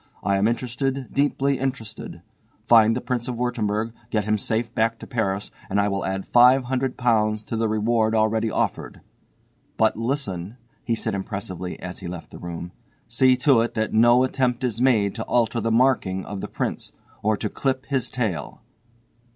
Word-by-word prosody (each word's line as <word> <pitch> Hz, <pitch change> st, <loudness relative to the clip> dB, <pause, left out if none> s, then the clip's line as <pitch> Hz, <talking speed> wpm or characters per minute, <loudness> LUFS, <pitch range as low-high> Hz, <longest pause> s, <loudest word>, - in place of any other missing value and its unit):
I 100 Hz, 0 st, +2 dB
am 100 Hz, +2 st, +3 dB
interested, 125 Hz, +2 st, -2 dB
deeply 140 Hz, -1 st, +1 dB
interested. 130 Hz, -4 st, -5 dB, 0.4 s
Find 115 Hz, -1 st, +6 dB
the -, -, -3 dB
Prince 125 Hz, -1 st, -2 dB
of 125 Hz, -, -3 dB
Wurttemberg, 115 Hz, -2 st, -1 dB, 0.2 s
get 105 Hz, -3 st, 0 dB
him 110 Hz, 0 st, +2 dB
safe 115 Hz, +3 st, -2 dB
back 115 Hz, +1 st, +1 dB
to -, -, -10 dB
Paris 105 Hz, -5 st, -2 dB, 0.2 s
and 100 Hz, -, +1 dB
I 100 Hz, 0 st, +2 dB
will 100 Hz, 0 st, -2 dB
add 95 Hz, 0 st, -3 dB
£500 125 Hz, -4 st, +3 dB
to 115 Hz, -, -4 dB
the 110 Hz, 0 st, 0 dB
reward 110 Hz, +1 st, +1 dB
already 110 Hz, +1 st, +2 dB
offered. -, -, -2 dB, 0.8 s
But 110 Hz, 0 st, +3 dB
listen," 115 Hz, -5 st, -3 dB, 0.3 s
he 115 Hz, -, 0 dB
said 110 Hz, -1 st, -2 dB
impressively 95 Hz, -2 st, -5 dB
as 90 Hz, 0 st, -6 dB
he 95 Hz, -, -7 dB
left 85 Hz, -1 st, -8 dB
the -, -, -10 dB
room, 85 Hz, 0 st, -6 dB, 0.4 s
"see 130 Hz, +2 st, +4 dB
to 135 Hz, -6 st, +6 dB
it 115 Hz, -, -2 dB
that 110 Hz, -1 st, -1 dB
no 120 Hz, +3 st, +5 dB
attempt 130 Hz, -1 st, 0 dB
is 120 Hz, -2 st, -1 dB
made 110 Hz, -7 st, +3 dB
to -, -, -4 dB
alter 115 Hz, -1 st, +1 dB
the 115 Hz, +1 st, 0 dB
marking 115 Hz, -6 st, +2 dB
of 100 Hz, -2 st, -6 dB
the -, -, -4 dB
prince, -, -, -4 dB, 0.3 s
or 110 Hz, 0 st, +1 dB
to 105 Hz, -, -2 dB
clip 130 Hz, +4 st, -2 dB
his 135 Hz, -4 st, -1 dB
tail." 110 Hz, -10 st, -3 dB
115 Hz, 175 wpm, -24 LUFS, 105-125 Hz, 0.8 s, Find